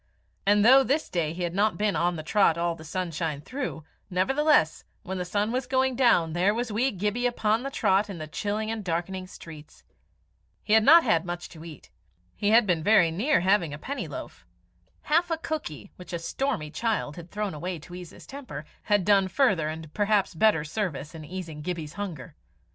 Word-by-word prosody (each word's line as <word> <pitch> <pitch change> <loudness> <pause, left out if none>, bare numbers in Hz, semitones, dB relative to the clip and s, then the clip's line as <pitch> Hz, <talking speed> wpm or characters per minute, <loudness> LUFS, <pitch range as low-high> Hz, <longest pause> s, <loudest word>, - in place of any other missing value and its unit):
And 205 +1 +5
though 265 +3 +8
this 285 +4 0
day 165 -4 -1
he 175 +2 -5
had 170 -1 -2 0.2
been 210 -1 +1
on 175 +1 +1
the 155 - -6
trot 170 -1 +3
all 170 0 0
the 160 - -11
sunshine 160 -2 -3
through, 255 - -5 0.3
nevertheless, 265 - +2 0.2
when 190 0 -4
the 180 - -2
sun 205 +4 -1
was 250 0 -2
going 260 0 +1
down 180 -11 +3
there 185 +5 +2
was 235 -1 -2
wee 240 +6 +1
Gibbie 210 +4 -1
upon 225 -2 +1
the 275 - -4
trot 205 -5 +1
in 195 - -6
the 155 - -5
chilling 210 +7 -3
and 225 -2 -4
darkening 185 +2 -3
streets. 155 -4 -12 0.8
He 210 - 0
had 220 0 +6
not 330 +7 +8
had 165 -9 +2
much 175 0 -5
to 160 -1 -12
eat. 160 -5 -12 0.4
He 205 - 0
had 225 +1 +6
been 175 -5 +1
very 185 -2 +4
near 210 - +2
having 180 -5 +2
a - - -9
penny 275 - -5
loaf. - - -8 0.6
Half 335 +3 +2
a 330 - 0
cookie, 295 - -5
which 180 0 -11
a - - 0
stormy 165 - -3
child 220 -8 -2
had 170 0 -10
thrown 210 -1 -3
away 175 +4 -4
to 160 +3 -13
ease 180 -1 -8
his - - -14
temper, 255 - -8 0.2
had 205 -4 +2
done 200 -1 +4
further 190 - +2
and 160 -1 -8
perhaps 205 -1 +1
better 170 -2 +3
service 155 -3 -4
in 160 -1 -9
easing 165 -2 -7
Gibbie's 160 -2 -5
hunger. 185 -9 -6
190 Hz, 200 wpm, -27 LUFS, 165-220 Hz, 0.8 s, though